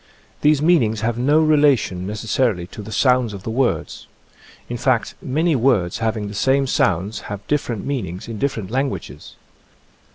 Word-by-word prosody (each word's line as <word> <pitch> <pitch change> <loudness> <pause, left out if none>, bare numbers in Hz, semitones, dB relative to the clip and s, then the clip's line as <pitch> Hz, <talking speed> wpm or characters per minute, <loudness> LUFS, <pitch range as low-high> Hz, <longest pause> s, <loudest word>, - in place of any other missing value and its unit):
These 150 -1 +3
meanings 115 -11 +3
have 115 +1 -1
no 145 +5 +3
relation 145 - +2
necessarily 105 -2 -1
to - - -7
the 105 +1 -9
sounds 125 -3 +2
of 95 -2 -8
the 115 - -4
words. 125 +2 -1 0.6
In 120 - -4
fact, 120 -3 0
many 155 +4 +1
words 115 -7 +1
having 110 -2 -1
the 100 - -7
same 135 +6 +2
sounds 100 -3 0
have 100 0 -6
different 125 -8 -2
meanings 115 -10 -4
in 115 -2 -6
different 115 -8 -2
languages. 135 +2 -4
120 Hz, 155 wpm, -20 LUFS, 105-135 Hz, 0.6 s, These